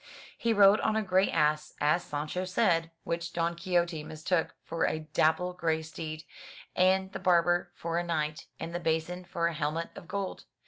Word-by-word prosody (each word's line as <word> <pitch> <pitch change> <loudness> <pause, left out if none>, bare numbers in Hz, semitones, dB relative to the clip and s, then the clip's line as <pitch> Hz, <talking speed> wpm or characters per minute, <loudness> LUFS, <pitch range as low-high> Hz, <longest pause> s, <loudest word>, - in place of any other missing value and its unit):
He 230 - 0
rode 205 -1 +6
on 220 - +1
a 220 - +1
grey 190 0 +3
ass, 150 -1 +1
as 150 +4 +2
Sancho 150 +5 -3
said, 185 -4 +2
which 170 0 -3
Don 170 0 0
Quixote 170 -2 0
mistook 160 +2 -1
for 165 0 -1
a 155 - -2
dapple 160 +3 +2
grey 160 -3 0
steed, 155 0 -6 0.5
and 190 +1 +3
the - - -5
barber 175 -1 +3
for 170 0 -2
a - - -1
knight, 155 -2 -2
and 165 +1 -5
the 175 - -2
basin 165 +2 -1
for 170 -1 -2
a 170 - +1
helmet 155 +2 -2
of 170 - -10
gold. 195 0 -4
170 Hz, 180 wpm, -30 LUFS, 160-185 Hz, 0.5 s, rode